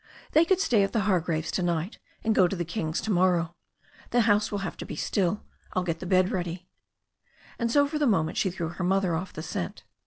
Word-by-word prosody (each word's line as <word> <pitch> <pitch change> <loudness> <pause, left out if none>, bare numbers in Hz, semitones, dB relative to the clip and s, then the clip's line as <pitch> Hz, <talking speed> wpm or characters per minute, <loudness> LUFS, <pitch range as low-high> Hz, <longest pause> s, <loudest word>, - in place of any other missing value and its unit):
"They 315 +2 +5
could 380 +1 +3
stay 235 - +3
at 195 - 0
the 225 - +2
Hargraves' 175 -5 0
to - - -1
night, 175 +2 -1 0.2
and 220 - +2
go 185 -3 +5
to 195 - -3
the 175 -2 -2
Kings' 160 -2 -2
to 220 - -2
morrow. 175 -2 +2 0.6
The 240 - +3
house 210 -1 +3
will 205 - -1
have - - -4
to - - -5
be - - -5
still. 195 0 0 0.3
I'll 185 - +1
get 165 -2 -2
the 185 - -6
bed 185 0 +3
ready." 180 0 -3 0.9
And 235 -1 0
so 285 +2 +4
for 300 +1 -3
the 295 - +3
moment 160 -8 +1
she 190 - +2
threw 170 -3 -4
her 180 +2 -5
mother 190 -1 +2
off 185 +3 -4
the 155 - -7
scent. 90 - -4
185 Hz, 235 wpm, -27 LUFS, 170-210 Hz, 0.9 s, They